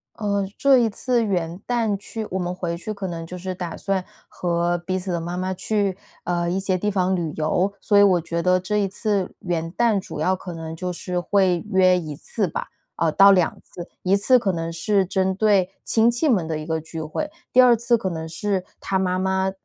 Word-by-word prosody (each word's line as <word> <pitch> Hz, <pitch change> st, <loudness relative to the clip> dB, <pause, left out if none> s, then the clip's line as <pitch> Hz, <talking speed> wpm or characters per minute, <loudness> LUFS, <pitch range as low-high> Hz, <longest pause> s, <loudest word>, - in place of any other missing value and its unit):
呃， 200 Hz, -2 st, -1 dB
这 275 Hz, -2 st, +5 dB
一 235 Hz, -2 st, +3 dB
次 240 Hz, +3 st, 0 dB
元 175 Hz, -4 st, -2 dB
旦 230 Hz, -4 st, 0 dB
去 215 Hz, +2 st, -6 dB
我 190 Hz, -, -1 dB
们 180 Hz, 0 st, -2 dB
回 175 Hz, -2 st, -3 dB
去 215 Hz, +5 st, -5 dB
可 200 Hz, -2 st, -5 dB
能 165 Hz, -2 st, -5 dB
就 180 Hz, +2 st, -8 dB
是 185 Hz, +1 st, -5 dB
打 175 Hz, -2 st, -5 dB
算 195 Hz, -2 st, -1 dB, 0.2 s
和 175 Hz, 0 st, 0 dB
彼 185 Hz, +2 st, -2 dB
此 185 Hz, 0 st, -4 dB
的 170 Hz, -1 st, -1 dB
妈 175 Hz, +2 st, -4 dB
妈 185 Hz, +1 st, -1 dB
去， 200 Hz, 0 st, -1 dB, 0.3 s
呃， 175 Hz, 0 st, 0 dB
一 190 Hz, -, 0 dB
些 190 Hz, -1 st, 0 dB
地 210 Hz, +3 st, -1 dB
方 185 Hz, -1 st, +1 dB
旅 165 Hz, -3 st, -2 dB
游。 175 Hz, +5 st, +1 dB
所 205 Hz, -, +2 dB
以 205 Hz, -, +8 dB
我 180 Hz, -4 st, +4 dB
觉 170 Hz, +1 st, -3 dB
得 185 Hz, 0 st, +3 dB
这 210 Hz, +3 st, -2 dB
一 200 Hz, -1 st, +2 dB
次 200 Hz, -1 st, -1 dB
元 165 Hz, -2 st, -2 dB
旦 225 Hz, -2 st, +2 dB
主 185 Hz, -, -8 dB
要 185 Hz, +5 st, +2 dB
可 180 Hz, -1 st, -8 dB
能 160 Hz, 0 st, -6 dB
就 180 Hz, +2 st, -3 dB
是 180 Hz, 0 st, -3 dB
会 180 Hz, -1 st, +2 dB
约 185 Hz, -1 st, +5 dB
1 155 Hz, -4 st, -5 dB
次 205 Hz, +7 st, -2 dB
吧， 160 Hz, -, -4 dB, 0.3 s
哦， 165 Hz, -, +2 dB
到 200 Hz, +4 st, +7 dB
2 180 Hz, -4 st, +3 dB
次。 175 Hz, 0 st, -10 dB, 0.2 s
一 190 Hz, +2 st, +3 dB
次 250 Hz, +6 st, +4 dB
可 210 Hz, -5 st, 0 dB
能 165 Hz, -1 st, -3 dB
是 195 Hz, +4 st, +1 dB
针 190 Hz, +1 st, 0 dB
对 200 Hz, -2 st, +3 dB, 0.2 s
亲 230 Hz, +1 st, +3 dB
戚 275 Hz, +7 st, 0 dB
们 200 Hz, -, +2 dB
的 160 Hz, -1 st, -2 dB
一 155 Hz, -, -6 dB
个 160 Hz, -1 st, -2 dB
聚 160 Hz, 0 st, -7 dB
会， 230 Hz, -, -4 dB, 0.2 s
第 255 Hz, -, +8 dB
二 245 Hz, -1 st, +7 dB
次 235 Hz, +1 st, +2 dB
可 190 Hz, -4 st, -2 dB
能 160 Hz, -1 st, -5 dB
是 190 Hz, +3 st, -2 dB, 0.2 s
他 190 Hz, -1 st, 0 dB
妈 185 Hz, -1 st, 0 dB
妈， 190 Hz, 0 st, 0 dB
185 Hz, 240 characters per minute, -23 LUFS, 175-200 Hz, 0.3 s, 以